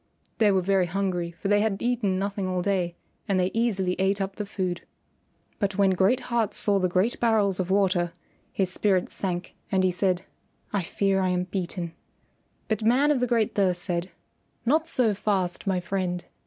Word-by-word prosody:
They 215 -2 +5
were 190 -2 +2
very 190 -1 +2
hungry, 180 -2 -1
for 170 +3 -6
they 205 +1 +4
had 210 -2 0
eaten 230 -6 0
nothing 200 0 -2
all 180 -1 -1
day 180 -3 0 0.3
and 195 -2 +2
they 180 +1 +1
easily 195 -6 0
ate 195 +1 +2
up 195 0 -3
the 210 -1 -4
food. 185 -3 -3 0.8
But 200 -2 -1
when 195 -1 +4
Great 195 +8 +2
Heart 235 -4 -1
saw 200 -1 +3
the 185 -1 +1
great 185 +7 +1
barrels 210 -5 +2
of 185 -1 -1
water, 185 -3 +2 0.4
his 185 -2 -1
spirits 190 -3 +1
sank, 180 -2 -3 0.2
and 190 -1 +2
he 185 - +3
said, 180 0 0 0.5
"I 200 - +1
fear 195 +2 0
I 185 - +1
am 180 0 +1
beaten." 180 -2 -4 0.7
But 220 -1 -1
Man 260 +7 +4
of 285 - +2
the 250 - +1
Great 230 -3 +1
Thirst 180 -3 +1
said, 175 0 -2 0.6
"Not 310 +6 +2
so 245 -9 +2
fast, 195 -3 -1
my 190 -2 +2
friend. 180 0 -2
195 Hz, 185 wpm, -26 LUFS, 180-205 Hz, 0.8 s, They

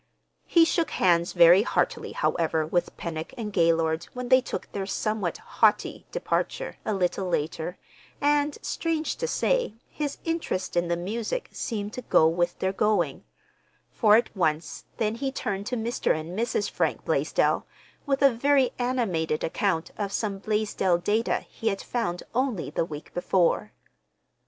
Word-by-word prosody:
He 335 -1 +6
shook 330 0 +1
hands 175 0 +2
very 175 +2 +7
heartily, - - -1
however, 165 - 0
with 175 +3 -1
Pennock 160 -2 -5
and 215 -3 -5
Gaylord 165 -2 +2
when 250 -1 -5
they 255 0 +7
took - - -5
their 195 -1 -4
somewhat 215 -2 -1
haughty 455 +2 +1
departure, - - -2
a - - -2
little 185 0 0
later, 165 +2 -2 0.4
and, 290 0 +2
strange 320 -2 -1
to 485 - -2
say, - - +1
his 290 -2 -4
interest 325 - -2
in 175 0 +2
the 170 0 0
music 220 - -3
seemed 210 -2 -4
to 250 - -5
go 160 -8 +4
with 175 +1 0
their 190 0 -1
going; 210 +1 +1 0.7
for 215 -3 +5
at 230 - +1
once 155 -4 -1
then 215 -2 0
he 270 +4 -2
turned 200 -5 -3
to 250 - -1
Mr. 230 -8 0
and 165 +3 -7
Mrs. 220 -1 0
Frank - - -1
Blaisdell - - +1 0.4
with 275 0 +1
a 275 -2 +6
very 270 +2 +3
animated 200 -12 0
account 165 -1 0
of 200 -1 -2
some 200 -1 -2
Blaisdell 210 -4 +1
data 210 +6 0
he 225 - -6
had 195 -3 +1
found 200 -8 -2
only 250 -6 -1
the - - 0
week 150 -2 -9
before. 180 +3 +1
205 Hz, 155 wpm, -26 LUFS, 175-250 Hz, 0.7 s, very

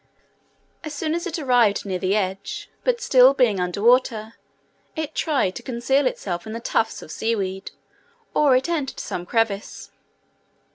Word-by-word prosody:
As 305 -1 -6
soon 310 +1 -2
as 340 +2 -2
it 345 0 -3
arrived 245 -9 +2
near 185 -2 -2
the 190 +2 +1
edge, 195 -1 -3
but - - +1
still 260 +1 +6
being 235 -8 +2
under 180 +3 -2
water, 230 -2 +3 0.6
it 315 -1 -4
tried 270 - 0
to - - -8
conceal 260 +3 +1
itself 175 -6 -4
in 220 - -6
the 230 - -4
tufts 225 -1 -1
of - - -11
sea 230 +6 -1
weed, 190 -1 -4 0.6
or 285 -4 +4
it 255 - +1
entered 305 -6 -2
some 175 0 -5
crevice. 220 -2 -2
235 Hz, 160 wpm, -23 LUFS, 200-275 Hz, 0.6 s, still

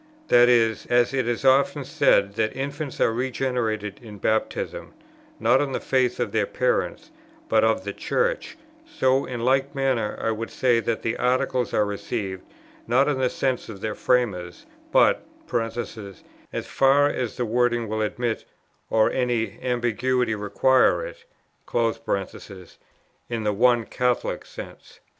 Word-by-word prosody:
That 120 0 +6
is, 115 -3 +2
as 120 +1 +3
it 130 -3 0
is 120 +2 -2
often 135 +1 +3
said 135 -9 +3
that 110 0 -1
infants 140 +1 -4
are 115 - +3
regenerated 120 -5 -2
in 110 -3 -10
Baptism, 110 +2 -2 0.4
not 120 +5 +4
on 140 -2 -2
the - - -1
faith 130 -2 0
of - - -1
their - - +1
parents, - - -1 0.4
but - - +3
of - - +2
the - - -4
Church, - - -1 0.3
so 135 - +1
in 120 -2 -5
like 135 +2 +1
manner 130 -6 0
I 115 - 0
would 115 +1 -4
say 120 -3 +2
that 115 -1 -2
the 115 - -1
Articles 125 -1 0
are 105 - +2
received, 100 -2 -4 0.5
not 130 +4 +3
in 145 -3 0
the 130 -1 +2
sense 130 -3 -2
of 100 -3 -9
their 110 -1 -2
framers, 100 -10 -1 0.3
but - - +4 0.3
(as 115 -3 -5
far 140 +1 +4
as 125 -5 -3
the 125 - 0
wording 120 0 +1
will 110 +1 -2
admit 115 +2 -2 0.4
or 110 -1 +3
any 120 -3 -1
ambiguity 125 0 0
requires 130 - +1 0.4
it) 100 -5 -3 0.5
in 115 -2 -3
the 105 -1 +1
one 120 +1 +3
Catholic 125 0 -1
sense." - - -11
120 Hz, 145 wpm, -24 LUFS, 110-130 Hz, 0.5 s, That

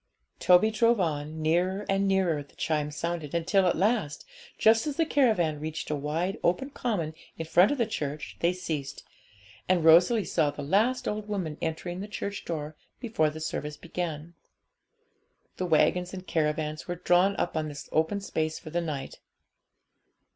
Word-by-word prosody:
Toby 180 +5 +5
drove 230 +1 +3
on; 155 -2 -2
nearer 180 +5 +1
and 195 0 +1
nearer 185 -6 +2
the 140 - -16
chimes 150 -2 -1
sounded, 170 -2 -3
until 185 +3 +2
at - - +1
last, 190 -6 0 0.3
just 225 +5 +4
as 295 - -2
the 330 - +2
caravan 215 - +2
reached 155 0 -5
a - - +1
wide 155 +6 -2
open 225 +11 +1
common 200 - -2 0.2
in 160 - -4
front 175 +4 +5
of 290 - -1
the 235 - +2
church, 150 -8 -4
they 170 - +3
ceased, 150 -6 -5 0.7
and 175 -3 +3
Rosalie 180 +6 +6
saw 155 -2 +1
the 145 0 -6
last 220 - +1
old 210 0 -3
woman 185 -7 -3
entering 170 +2 -3
the 200 - -5
church 200 -1 -5
door 155 -2 -4 0.2
before 220 -11 +1
the 155 +1 -8
service 150 -1 -4
began. 170 -1 -5 1.2
The 185 - -2
waggons 180 +3 +2
and 185 0 -8
caravans 155 -2 -1
were 175 - -2
drawn 180 +3 +3
up 175 - -2
on 155 -1 -1
this 145 -2 -8
open 160 +6 +1
space 160 -5 -2
for 155 - -10
the 175 +1 0
night. 145 -5 -5
170 Hz, 170 wpm, -28 LUFS, 155-195 Hz, 1.2 s, Rosalie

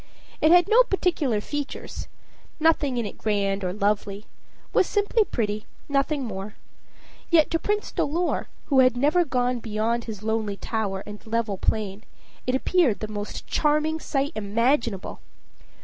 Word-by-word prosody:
It 310 - +5
had 355 +1 +6
no 455 +4 +7
particular 350 - +1
features 290 +4 -5 0.5
nothing 305 -5 +2
in 235 - 0
it 205 - -7
grand 200 -2 0
or 180 - -1
lovely 205 +1 -1 0.5
was - - +4
simply 415 +2 +2
pretty, 215 - -3 0.2
nothing 280 0 0
more; 205 -2 -6 0.7
yet 320 -3 +4
to 330 - +2
Prince 415 +3 -1
Dolor, 340 +4 0 0.2
who 275 -3 +3
had 255 -1 +5
never 300 +7 +3
gone 250 -4 0
beyond 225 +1 -1
his 215 -3 -7
lonely 220 -2 -1
tower 200 -4 -2
and 210 0 -9
level 220 -4 -1
plain, 210 -1 -1 0.4
it 255 - +2
appeared 270 - +2
the 215 - -4
most 205 -1 -6
charming 305 +1 +1
sight 280 -1 -1
imaginable. 230 0 0
235 Hz, 145 wpm, -25 LUFS, 210-305 Hz, 0.7 s, no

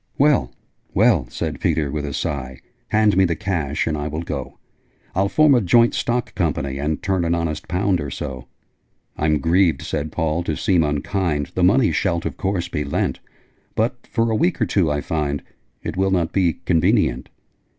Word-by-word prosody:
'Well, 140 - +3 0.4
well!' - - +4
said - - -4
Peter, 75 -4 0
with 75 0 -3
a 70 - -4
sigh. 65 -2 -3 0.3
'Hand 105 -2 +3
me 95 - +5
the 85 -3 +1
cash, 80 -6 -1
and 80 - -1
I 75 0 -3
will 80 +2 -4
go. 70 -5 -5 0.6
I'll 100 +2 +1
form 155 +4 +5
a 125 - +4
Joint 115 +5 +4
Stock 120 +1 -1
Company, 75 -7 -1
And 75 +2 -2
turn 95 -2 +1
an 85 0 +1
honest 80 -2 -3
pound 90 0 +1
or 70 - -4
so.' 65 -1 -6 0.7
'I'm 75 0 +2
grieved,' 85 +4 +2
said 75 +1 -3
Paul, 80 0 -1
'to 80 -2 -2
seem 90 -4 +2
unkind: 75 +1 -1
The 90 - 0
money 105 +5 +4
shalt 85 -4 0
of - - -3
course 95 -3 -1
be 80 -4 -2
lent: 70 - -1 0.6
But, 120 +2 -1
for 115 -1 0
a - - +1
week 170 +7 +1
or 115 - +2
two, 90 -3 +1
I 75 0 -1
find 75 -3 -2 0.4
It - - -4
will 95 +1 +1
not 90 -4 0
be 90 -4 +1
convenient.' 80 -7 +2
85 Hz, 185 wpm, -21 LUFS, 75-95 Hz, 0.7 s, me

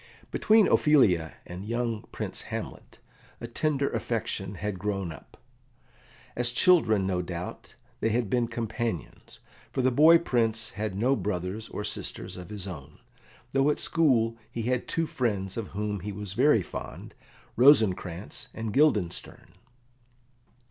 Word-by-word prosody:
Between 215 -2 +4
Ophelia 95 - +4
and 90 +1 -7
the 100 - -8
young 115 -1 -2
Prince - - -5
Hamlet - - -6 0.4
a - - -6
tender 140 +3 0
affection 100 -4 -3
had 100 0 -4
grown 100 -3 -2
up. 75 - -13 1.0
As 120 0 0
children, 120 - +4
no 90 -1 0
doubt, 90 0 -7 0.2
they 110 - +1
had 115 0 0
been 120 +3 +1
companions, 115 -5 -4 0.3
for 130 - -1
the 130 - +4
boy 155 +6 +7
Prince 115 -7 0
had 105 -2 -4
no 125 +7 +2
brothers 100 0 -3
or 105 - -5
sisters 105 - -4
of 90 0 -9
his 105 -3 -6
own, 75 -5 -9 0.6
though 135 +2 +3
at 150 - 0
school 125 -9 +2 0.2
he 115 - -4
had 125 +1 -1
two 165 - 0
friends 100 -10 -2
of 115 -3 -4
whom 105 -1 -2
he 105 +4 -5
was 100 -1 -6
very 125 -2 +4
fond, - - -8 0.4
Rosencrantz 105 - +3
and 110 -2 -4
Guildenstern. 105 - +1
110 Hz, 140 wpm, -28 LUFS, 95-125 Hz, 1.0 s, boy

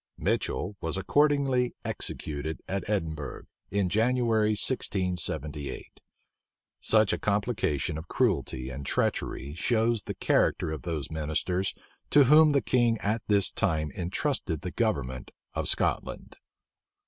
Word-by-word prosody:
Mitchel 100 +3 -1
was 80 +2 -2
accordingly 135 +1 +2
executed 75 +1 -4
at 100 0 -3
Edinburgh, 80 -8 -3 0.3
in 100 -1 +1
January, 110 0 +2
1678. 90 - -2 0.8
Such 110 -2 +3
a - - -2
complication 100 - 0
of 80 - -10
cruelty 65 +1 0
and 70 +2 -6
treachery 70 +1 -1
shows 115 +5 +1
the - - -6
character - - +1
of 80 - -4
those 80 -3 -4
ministers 80 +5 -1 0.3
to 145 - +7
whom 150 +3 +7
the 140 - +2
king 120 -2 +2
at 105 +2 -1
this 100 -3 +4
time 80 -8 0
intrusted 90 - -2
the 90 - -4
government 70 - -1 0.2
of - - -1
Scotland. - - -1
95 Hz, 120 wpm, -28 LUFS, 80-115 Hz, 0.8 s, to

